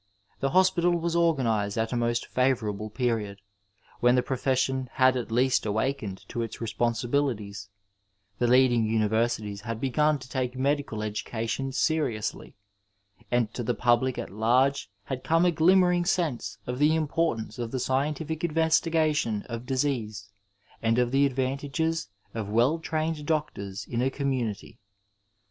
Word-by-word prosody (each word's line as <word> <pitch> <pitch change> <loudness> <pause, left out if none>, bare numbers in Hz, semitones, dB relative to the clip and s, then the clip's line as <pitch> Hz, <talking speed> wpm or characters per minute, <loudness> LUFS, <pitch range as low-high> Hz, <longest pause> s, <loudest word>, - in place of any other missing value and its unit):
The 135 - 0
hos 185 +5 +4
pital 175 0 +2
was 170 0 -1
organized 120 -12 +1
at 110 +1 -1
a - - 0
most 120 0 0
favourable 110 -5 0
period, 105 -3 -2 0.6
^en 120 +1 +5
tiie 125 - +1
profession 130 0 0
had 130 0 +4
at 120 -2 -4
least 125 +2 +2
awakened 110 -2 -2
to 120 - -3
its 115 - -5
responsibilities, 115 -2 -1 0.7
the 120 - +2
leading 125 -1 +4
universities 110 -1 0
had 115 0 -5
began 150 +3 +2
to 130 - -12
take 130 -1 -3
medical 135 -5 -1
education 115 +5 -3
seriously, 130 -7 -1 0.7
and 120 -3 +1
to - - -4
the 120 +1 -1
public 120 +1 +2
at - - -5
large 120 +4 +2
had 130 +4 -5
come 165 +5 +3
a 175 - +4
glimmering 175 +1 +4
sense 170 -9 -1
of 125 +1 -4
the 150 +2 +4
importance 155 -6 -1
of 120 -1 -3
the 130 - -3
scientific 150 +5 -1
investigation 160 -7 +1
of 115 0 -7
disease 115 -7 -2 0.5
and 115 +1 +2
of 125 -1 +2
the 140 +1 +4
advantages 140 +5 -2 0.3
of 110 -3 -4
well 120 +9 +2
trained 155 -1 -2
doctors 100 -11 -2
in 120 0 -2
a 130 - +2
community. 125 -6 -3
125 Hz, 145 wpm, -27 LUFS, 115-145 Hz, 0.7 s, ^en